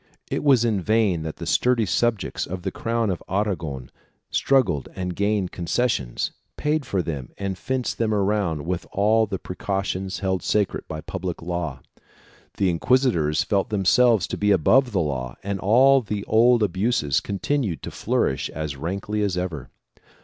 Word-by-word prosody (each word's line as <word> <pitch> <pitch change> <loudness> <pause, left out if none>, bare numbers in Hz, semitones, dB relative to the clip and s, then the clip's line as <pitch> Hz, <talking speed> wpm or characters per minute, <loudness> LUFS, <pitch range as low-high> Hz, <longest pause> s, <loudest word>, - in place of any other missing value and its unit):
It - - -1
was 130 -5 +5
in 105 -5 +1
vain 105 -3 +2
that 80 0 -5
the - - -7
sturdy 125 -3 +2
subjects 110 +2 0
of 90 0 -6
the 95 - -2
crown 115 -1 -1
of 90 - -4
Aragon 90 - -2 0.4
struggled 130 - +2
and 90 -1 -3
gained 100 -2 0
concessions, 85 - -1 0.3
paid 150 -2 0
for 95 -3 0
them 70 -7 -5
and 100 -1 -3
fenced 130 +5 -3
them 115 -2 +1
around 100 -7 0
with 90 0 -3
all 110 +2 +3
the 100 -1 -3
precautions 95 +1 -3
held 95 -1 -1
sacred 105 -2 0
by 80 0 -5
public 90 -1 -5
law. 80 -6 -4 0.8
The 95 -2 +2
inquisitors 85 - +2
felt 100 -2 0
themselves 105 +1 +4
to - - -3
be 105 - +1
above 120 - +4
the 100 - 0
law 65 -5 -3
and 100 0 -3
all 130 +8 +5
the 105 -3 -4
old 115 +1 +4
abuses 95 - +1
continued 100 - -2
to - - -5
flourish - - 0
as 75 -2 -4
rankly 100 +8 -3
as 100 -3 0
ever. 85 -6 -4
100 Hz, 160 wpm, -24 LUFS, 85-110 Hz, 0.8 s, was